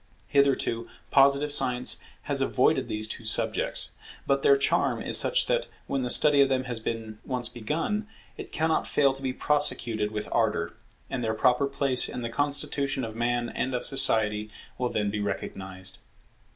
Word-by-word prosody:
Hitherto 135 -4 +1 0.2
Positive 140 +1 +4
science 125 -3 +3 0.2
has - - -2
avoided - - +1
these 110 0 -2
two 115 - -7
subjects: 110 - 0 0.3
but 140 0 +1
their 140 0 +5
charm 140 - +1
is - - -1
such - - +5
that, - - 0 0.2
when 135 - -2
the 125 - -3
study 145 +2 +5
of 135 - +4
them 130 -1 0
has 120 -3 -5
been 110 -1 -5
once 125 -3 0
begun, 160 - -3 0.3
it - - -9
cannot 160 0 0
fail 140 -2 +2
to 135 - -11
be 130 -1 -2
prosecuted 120 -7 0
with 105 0 -5
ardour; 105 -7 0 0.4
and 125 -2 -3
their 110 -1 -1
proper 125 +4 +2
place 135 -2 +3
in 125 - -5
the 115 - -3
constitution 140 0 -1
of 110 -1 -8
Man 120 0 -1
and 130 0 -3
of 125 - -3
Society 110 -5 +2 0.3
will 125 -1 0
then 105 -3 -1
be 105 - -3
recognized. 95 -2 -5
125 Hz, 170 wpm, -26 LUFS, 110-140 Hz, 0.4 s, their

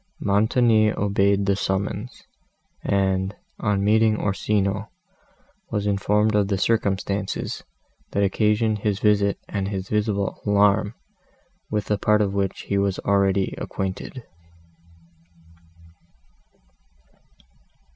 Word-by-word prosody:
Montoni 110 +2 +3
obeyed 100 0 +1
the 100 0 +2
summons, 100 +4 -3 0.6
and, 95 0 0 0.2
on 100 -2 0
meeting 110 +1 +3
Orsino, 100 0 -1 0.8
was 105 -1 -2
informed 105 +2 +1
of 105 -1 +2
the 100 -1 0
circumstances, 100 -2 -1 0.5
that 100 - 0
occasioned 105 +2 +1
his 105 -1 0
visit 105 -1 +2
and 100 -2 -2
his 95 -1 -4
visible 105 -2 -1
alarm, 105 +1 +3 0.7
with 105 -1 -2
a 105 - +1
part 105 0 +3
of 100 -1 -2
which 100 -1 -1
he 100 - -1
was 100 -1 0
already 100 -1 +2
acquainted. 95 +6 -5
100 Hz, 100 wpm, -23 LUFS, 100-105 Hz, 0.8 s, Montoni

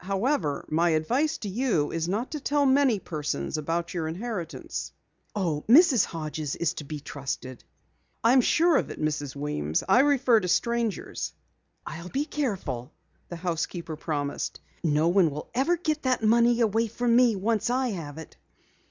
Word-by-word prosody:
However, 195 - -1
my 170 +3 +2
advice 270 - 0
to 210 - -6
you 200 - 0
is 165 +1 -2
not 220 +7 -2
to 305 - -3
tell 290 0 +1
many 265 -4 +4
persons 155 -5 -3
about 165 +3 -2
your 165 -3 -2
inheritance." 180 0 -5 0.4
"Oh, 165 -7 -1
Mrs. 265 - +7
Hodges 155 -3 -4
is 170 0 0
to 160 - -7
be 150 +1 -6
trusted." 135 -3 -6 0.6
"I 230 +2 +5
am 260 - +6
sure 330 +5 +4
of - - -1
it, - - -8
Mrs. 145 -3 -2
Weems. 110 - -2
I - - +5
refer 265 -4 +4
to 185 - -3
strangers." 235 +3 -1 0.5
"I'll 170 +2 -7
be 280 +7 -1
careful," 185 - -3 0.4
the 175 - -5
housekeeper 170 -1 -3
promised. 145 -2 -3 0.2
"No 155 0 +2
one 180 -1 +4 0.3
ever 270 +8 +2
will 345 - -17
get 310 -1 0
that 255 -3 0
money 235 +2 +4
away 225 +1 +2
from 235 +1 +1
me 240 -3 +5
once 220 +3 0
I 255 +1 +1
have 160 -8 -6
it!" 160 - -10
195 Hz, 165 wpm, -27 LUFS, 155-245 Hz, 0.6 s, Mrs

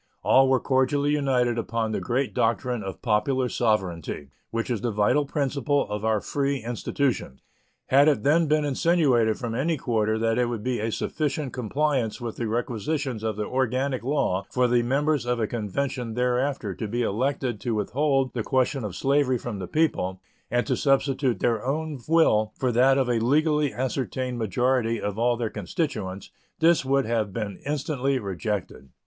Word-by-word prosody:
All 135 0 +5
were 130 -1 +4
cordially 140 +3 +1
united 125 -5 +1
upon 115 -1 -2
the - - -1
great 130 +2 -1
doctrine 120 +1 0
of 95 -2 -7
popular 125 +3 +1
sovereignty, 90 - -1 0.2
which 115 +2 -2
is 115 - -1
the 120 - 0
vital 105 +7 +2
principle 140 -1 0
of 105 0 -3
our 110 -1 +2
free 140 +4 -1
institutions. 120 - -2 0.4
Had 140 +3 +5
it 150 - +2
then 155 +3 +3
been 150 0 +2
insinuated 135 -7 +2
from 120 -2 -4
any 155 +7 0
quarter 110 -4 0
that 115 +1 +1
it 125 - +3
would 115 -3 -4
be 125 0 -1
a 110 +2 -1
sufficient 150 +1 -2
compliance 130 -1 -1
with 120 -2 -5
the 120 - -2
requisitions 120 +3 -2
of 110 -1 -2
the 105 0 -3
organic 130 +1 0
law 110 -9 0
for 125 -1 +2
the 120 0 +3
members 140 +2 0
of 125 -1 0
a 110 - +1
convention 120 +2 -3
thereafter 125 -3 0
to 110 - -5
be 120 +3 -1
elected 125 +1 -1
to 115 +1 -2
withhold 135 +5 0
the 120 - -2
question 130 +2 0
of 100 -4 -5
slavery 135 0 +2
from 115 -4 -6
the 90 - -5
people 95 - 0 0.3
and 120 0 +1
to 130 - 0
substitute 135 -1 +1
their 115 -3 +1
own 150 +2 -2
will 110 -10 +3
for 130 -3 0
that 130 +3 +4
of 135 -2 +2
a 120 -2 +1
legally 150 +4 +2
ascertained 130 -1 -3
majority 115 +2 +1
of 105 +1 -3
all 120 0 +2
their 115 -2 -2
constituents, 100 - -4 0.3
this 165 -2 +4
would 135 +1 +1
have 110 -3 -1
been 105 -3 -4
instantly 140 -2 0
rejected. 100 - -4
125 Hz, 175 wpm, -25 LUFS, 110-140 Hz, 0.4 s, All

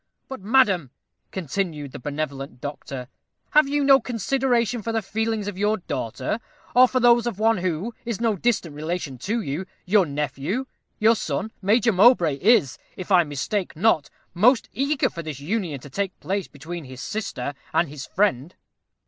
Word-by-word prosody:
But, 265 - -7
madam," 200 - +3 0.4
continued 165 -4 -3
the - - -8
benevolent 140 -2 -4
doctor, 135 -2 -6 0.4
"have 300 -2 +5
you 290 0 +1
no 275 -1 +7
consideration 240 0 0
for 230 - -3
the 225 -1 -1
feelings 220 +1 -2
of 200 -2 -5
your 210 +1 +2
daughter, 130 - -3 0.4
or 255 +1 +8
for 255 - 0
those 240 -1 +5
of 230 -5 -3
one 225 -1 +3
who 185 +5 -2
is 235 -4 -3
no 230 -2 +1
distant 195 -6 0
relation 155 -4 -4
to 220 - -1
you 165 +2 -4 0.2
your 190 -1 +4
nephew? 150 - -2 0.3
Your 225 +2 +5
son, 185 +3 -3
Major 220 +4 +3
Mowbray, 185 - +5
is, 195 - +3 0.2
if 185 +2 -7
I 180 -2 +6
mistake 165 +7 -3
not, 165 -4 +2 0.2
most 225 +8 +4
eager 280 +2 +1
for 170 - -6
this 155 -4 -6
union 165 -2 -2
to 145 - -11
take 195 +4 -3
place 195 0 -2
between 160 +3 -8
his 130 -1 -10
sister 145 - -4 0.2
and 170 - +2
his 140 -2 -8
friend." 180 -5 0
190 Hz, 165 wpm, -24 LUFS, 150-225 Hz, 0.4 s, or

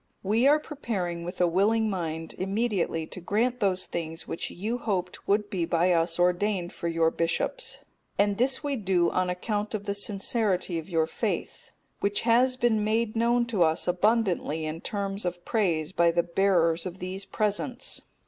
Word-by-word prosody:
We 220 +6 +3
are 295 +2 +6
preparing 195 - -4
with 175 +2 -6
a 180 - +5
willing 210 +6 +2
mind 165 -5 -3
immediately 195 -4 0
to 185 - -9
grant 235 +7 0
those 185 -3 +1
things 165 0 -5
which - - -4
you 220 +7 -3
hoped 185 -6 -3
would 205 +1 +2
be 185 -5 0
by 170 +2 +2
us 165 -1 +2
ordained 180 +1 +1
for 170 - -4
your 165 -1 +2
bishops, 170 - -1 0.4
and 205 0 +2
this 260 +4 +1
we 285 -2 -1
do 185 -5 +2
on 185 0 +1
account 205 +4 -2
of 205 -1 -5
the 200 - -1
sincerity 200 -3 -1
of 160 - -10
your 165 -3 +2
faith, 160 - -3 0.3
which 200 0 0
has 250 +2 +3
been 230 -4 +2
made 220 +1 0
known 235 +1 +3
to 225 -6 -2
us 160 +1 +3
abundantly 180 -5 +1
in 155 +2 -4
terms 200 0 -3
of 175 -1 -4
praise 175 -9 +1
by 170 -2 +4
the 170 +1 +2
bearers 170 -2 +2
of 180 0 -7
these 185 +2 -5
presents. 215 +5 -2
195 Hz, 175 wpm, -27 LUFS, 170-220 Hz, 0.4 s, are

